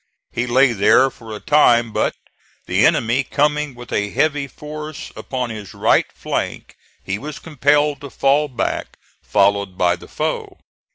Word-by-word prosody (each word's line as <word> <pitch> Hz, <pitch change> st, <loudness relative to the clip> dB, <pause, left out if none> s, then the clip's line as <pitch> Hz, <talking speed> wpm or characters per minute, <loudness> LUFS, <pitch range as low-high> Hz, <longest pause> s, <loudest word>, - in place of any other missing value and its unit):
He 120 Hz, -, -2 dB
lay 130 Hz, +1 st, +4 dB
here 125 Hz, +6 st, +4 dB
for 115 Hz, -3 st, -12 dB
a -, -, -7 dB
time, 120 Hz, -6 st, +4 dB
but -, -, 0 dB, 0.5 s
the -, -, +4 dB
enemy 120 Hz, +4 st, +1 dB
coming 150 Hz, -1 st, 0 dB
with 120 Hz, 0 st, -10 dB
a 105 Hz, 0 st, 0 dB
heavy 145 Hz, +3 st, 0 dB
force 150 Hz, +2 st, -8 dB
upon 125 Hz, -3 st, -4 dB
his 105 Hz, -3 st, -8 dB
right -, -, +3 dB
flank, -, -, -4 dB, 0.3 s
he 95 Hz, +2 st, -3 dB
was 150 Hz, +1 st, -7 dB
compelled 145 Hz, -1 st, +1 dB
to 140 Hz, -, -8 dB
fall 140 Hz, +3 st, +2 dB
back, 125 Hz, -4 st, -3 dB, 0.2 s
followed 100 Hz, -2 st, +1 dB
by 90 Hz, -1 st, +3 dB
the 90 Hz, -, -14 dB
foe. -, -, -3 dB
130 Hz, 155 wpm, -20 LUFS, 110-145 Hz, 0.5 s, lay